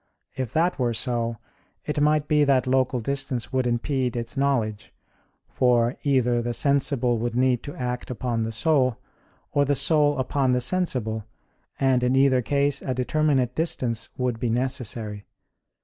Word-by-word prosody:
If 130 -4 -4
that 170 0 +1
were 120 -2 0
so, 115 -1 0 0.5
it 150 -1 -2
might 150 0 +2
be 150 -1 +3
that 135 -3 +3
local 130 -1 +1
distance 135 0 -2
would 130 -1 +1
impede 125 +1 -1
its 115 0 -4
knowledge; 120 -7 -1 0.6
for 120 -1 +2
either 125 -4 +2
the 120 0 -2
sensible 135 -4 +1
would 120 +1 -2
need 125 -1 +2
to 145 - -8
act 125 -1 -4
upon 120 -2 -2
the 110 0 -2
soul, 130 +1 +1 0.5
or 145 - +2
the 140 0 +1
soul 150 -1 +3
upon 130 0 0
the 125 - +2
sensible, 120 - -1 0.5
and 130 -2 +2
in 125 +1 +1
either 135 -1 +4
case 140 +3 0
a 130 - -3
determinate 130 -1 +1
distance 125 -8 -2
would 125 -3 -1
be 120 -1 -1
necessary. 115 -4 -3
130 Hz, 155 wpm, -24 LUFS, 120-140 Hz, 0.6 s, either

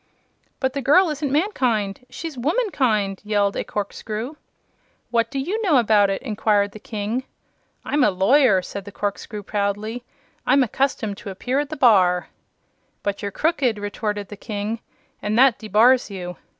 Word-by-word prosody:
"But 265 -1 0
the 280 - -2
girl 315 +6 +5
isn't 290 -2 -3
mankind! 250 - 0
She's 325 -3 -6
womankind!" 250 - 0
yelled 205 -1 +1
a - - -1
corkscrew. 215 +5 -4 0.8
"What 230 -1 +2
do 275 - -5
you 365 +12 -1
know 350 -10 +3
about 210 -4 +4
it?" 195 - -2
inquired 210 -4 +1
the 215 - -11
King. 215 +3 -3 0.6
"I'm 290 -1 +2
a 215 - +5
lawyer," 195 +1 +4
said 200 +1 -7
the 205 - -9
corkscrew, 205 +1 -4
proudly. 210 +4 -2 0.4
"I - - +2
am 275 - +5
accustomed 230 -4 -1
to 205 - -8
appear 250 +8 -1
at 290 -1 -2
the 310 - -5
bar." 185 -8 +4 0.7
"But 200 -1 -2
you're 205 - -2
crooked," 260 - +1
retorted 205 0 -3
the 205 - -9
King, 210 +2 -4 0.4
"and 210 +1 -1
that 260 -2 +5
debars 225 +4 +4
you. 180 -3 -6
220 Hz, 160 wpm, -22 LUFS, 205-265 Hz, 0.8 s, girl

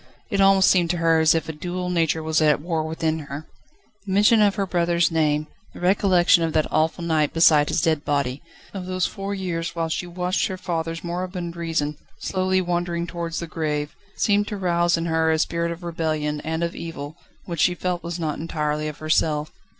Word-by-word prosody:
It 200 -1 +2
almost 195 -1 +5
seemed 175 -3 +3
to 175 - 0
her 165 -1 +3
as 160 0 +4
if 165 - -1
a 160 - -4
dual 180 +3 -4
nature 165 -2 +1
was 160 0 +1
at 150 -2 +4
war 165 +1 -2
within 160 0 -1
her. 145 0 -7 0.6
The - - -3
mention 210 +3 +5
of 205 -1 +4
her 200 -2 0
brother's 170 -1 +1
name, 155 -2 +1 0.3
the - - -9
recollection 180 -1 +4
of 165 -1 -1
that 155 -1 +2
awful 160 +2 +1
night 155 -3 +1
beside 155 -3 +5
his 165 - 0
dead 160 -4 +1
body, 140 -2 -1 0.3
of 185 -2 -6
those 185 -1 0
four 200 0 -4
years 170 -3 -3
whilst 165 -1 -1
she 180 - -4
watched 180 +1 -1
her 190 - -5
father's 165 -2 -3
moribund 175 0 -4
reason 160 -3 -2 0.2
slowly 185 0 0
wandering 175 -1 -1
towards 170 -1 -4
the 170 - -3
grave, 150 -3 -3 0.2
seemed 205 -1 +2
to 210 - -4
rouse 175 -2 +2
in 165 - -2
her 160 -1 +1
a 160 - +2
spirit 170 +1 0
of 170 +1 -7
rebellion, 155 -3 -2
and 160 +1 -2
of 170 - -2
evil, 155 -2 -7 0.3
which 170 -3 -5
she 180 - +3
felt 180 0 -2
was 170 0 -5
not 155 -3 -2
entirely 150 -1 -2
of 150 - -6
herself. 155 -1 0
170 Hz, 205 wpm, -23 LUFS, 155-180 Hz, 0.6 s, almost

